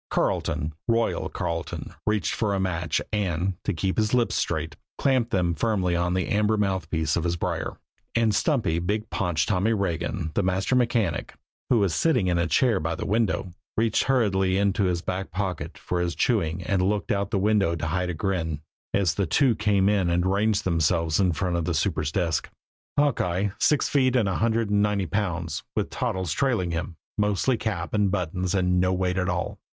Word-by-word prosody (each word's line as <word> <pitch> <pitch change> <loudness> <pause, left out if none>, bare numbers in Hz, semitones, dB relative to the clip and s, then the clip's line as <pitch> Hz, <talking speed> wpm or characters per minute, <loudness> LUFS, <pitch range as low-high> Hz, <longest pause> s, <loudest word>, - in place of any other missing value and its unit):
Carleton, 75 +2 0
"Royal" 115 -1 +1
Carleton, 85 -2 -4
reached 105 -2 +1
for 105 -3 0
a - - -1
match, 90 -3 -1
and, 95 -2 0
to - - 0
keep 95 +2 -1
his 110 +2 +2
lips 120 -2 +2
straight, 80 -1 -1 0.2
clamped 130 -4 +2
them 90 -5 +1
firmly 95 -3 0
on 90 +1 0
the 95 - 0
amber 105 +1 +2
mouthpiece 85 -6 0
of 85 - 0
his 85 0 0
brier, - - -3 0.4
and 115 -2 +3
stumpy, 110 - +1
big 105 +5 -2
paunched 85 -7 0
Tommy 105 +3 +2
Regan, 85 -3 -2
the - - +1
master 95 +6 0
mechanic, 115 -9 0 0.3
who 125 - +4
was 100 -5 +2
sitting 130 - +2
in 90 -1 +1
a 85 - +1
chair 115 - +3
by 85 0 -2
the - - -5
window, 105 -3 0 0.3
reached 115 0 +2
hurriedly 95 -8 +2
into 100 +1 +2
his 90 -1 0
back 95 +1 -3
pocket 90 -4 -4
for 90 -1 -2
his 85 -1 -1
chewing 90 -7 0
and 95 0 +1
looked 100 0 0
out 100 0 0
of - - -27
the 105 - 0
window 100 -3 +2
to 80 - -4
hide 90 +3 -1
a 90 - -3
grin, 80 -4 -2 0.4
as 95 -6 +2
the 100 +1 -1
two 125 - +3
came 100 -3 +2
in 100 -4 +2
and 85 +1 +1
ranged 100 +2 +1
themselves 85 -2 +1
in 95 -2 +3
front 85 +2 -1
of 85 -2 -1
the 90 - -1
super's 75 -2 0
desk 85 -3 -1 0.5
Hawkeye, 100 -9 +1
six 150 - +3
feet 130 -3 +2
and 115 -5 +3
a 95 - 0
hundred 115 -1 +1
and 105 0 +3
ninety 105 -2 +1
pounds, 85 -4 -2
with - - -1
Toddles 95 -3 -2
trailing 115 -11 0
him, 85 +1 -3 0.2
mostly 105 +5 +2
cap 100 -7 -3
and 105 -2 +2
buttons 90 0 -1
and 90 -1 +2
no 90 0 +2
weight 90 0 0
at 90 0 0
all. 90 0 -2
95 Hz, 195 wpm, -25 LUFS, 85-105 Hz, 0.5 s, who